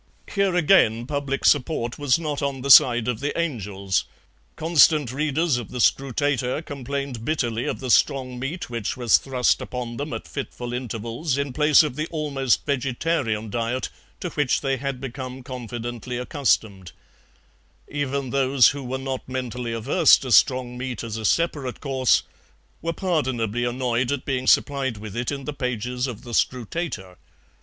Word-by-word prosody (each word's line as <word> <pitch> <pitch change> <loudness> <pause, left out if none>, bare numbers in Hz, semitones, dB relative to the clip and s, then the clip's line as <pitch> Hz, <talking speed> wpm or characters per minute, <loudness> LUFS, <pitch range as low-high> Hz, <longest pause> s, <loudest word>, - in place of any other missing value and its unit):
Here 200 -2 +1
again 145 - +4
public 140 0 -2
support 130 -4 +2
was 145 -2 +3
not 150 -3 -3
on 140 -2 -2
the 140 +2 +1
side 120 -2 +7
of 120 -3 -1
the 145 +4 -2
angels; 100 - -1 0.5
constant 155 -4 +4
readers 150 +1 0
of 120 - -6
the 125 - -6
SCRUTATOR 135 +2 +1
complained 140 -4 -5
bitterly 120 -5 -1
of - - -2
the 130 -2 -2
strong 130 -3 +2
meat 150 +8 -4
which 115 0 -3
was 120 -3 +4
thrust 130 -2 +1
upon 120 -2 -5
them 145 +1 -4
at - - -5
fitful 125 -3 -6
intervals 125 +4 -3
in 140 -2 -2
place 150 +2 +5
of 150 -5 -3
the 155 +2 -2
almost 140 -6 0
vegetarian 130 -5 -1
diet 120 +3 -2 0.3
to 180 - -3
which 145 -4 +1
they 135 -1 0
had 140 -1 -4
become 130 0 -7
confidently 120 -1 -6
accustomed; 110 - -1 0.9
even 140 -2 -3
those 135 -2 +4
who 140 0 -5
were 130 +1 -3
not 130 -1 -5
mentally 125 -2 -4
averse 135 +9 +5
to 130 - -6
strong 125 0 +3
meat 125 -3 -4
as 115 -2 -5
a 110 -1 -4
separate 145 -3 0
course 130 -3 +2 0.6
were 165 - -1
pardonably 130 - -1
annoyed 120 0 0
at 140 -2 -3
being 130 -2 -2
supplied 135 -5 +2
with 105 -1 -8
it 120 +2 -2
in 140 -1 -5
the 150 - -4
pages 125 -1 -2
of 120 -4 -7
the 120 - -9
SCRUTATOR. 120 - -2
130 Hz, 160 wpm, -24 LUFS, 120-145 Hz, 0.9 s, side